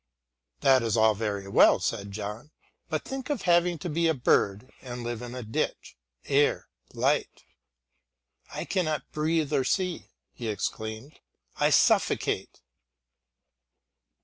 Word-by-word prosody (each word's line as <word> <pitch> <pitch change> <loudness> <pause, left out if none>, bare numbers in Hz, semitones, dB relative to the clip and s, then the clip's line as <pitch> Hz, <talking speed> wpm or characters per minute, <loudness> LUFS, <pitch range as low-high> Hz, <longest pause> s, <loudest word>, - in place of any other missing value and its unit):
"That 130 -1 +5
is 115 -1 0
all 110 0 +5
very 100 -2 -3
well," 100 - +5
said 100 0 -2
John, 105 +6 -6 0.4
"but - - -2
think 270 0 -6
of 290 -4 -2
having 175 -1 +3
to 155 - -6
be 165 +1 +1
a 160 - +2
bird 120 -2 +1
and 125 -2 -7
live 120 -1 -4
in 120 0 -7
a 125 - -5
ditch! 110 +1 -3 0.3
Air! 145 +1 +2 0.2
light! - - 0 1.1
I - - -5
cannot 155 -7 -2
breathe 155 -1 0
or 135 -2 +2
see," 180 +6 -1 0.3
he 120 - -6
exclaimed; 110 +5 -4 0.4
"I - - +3
suffocate!" - - +2
130 Hz, 130 wpm, -27 LUFS, 110-160 Hz, 1.1 s, That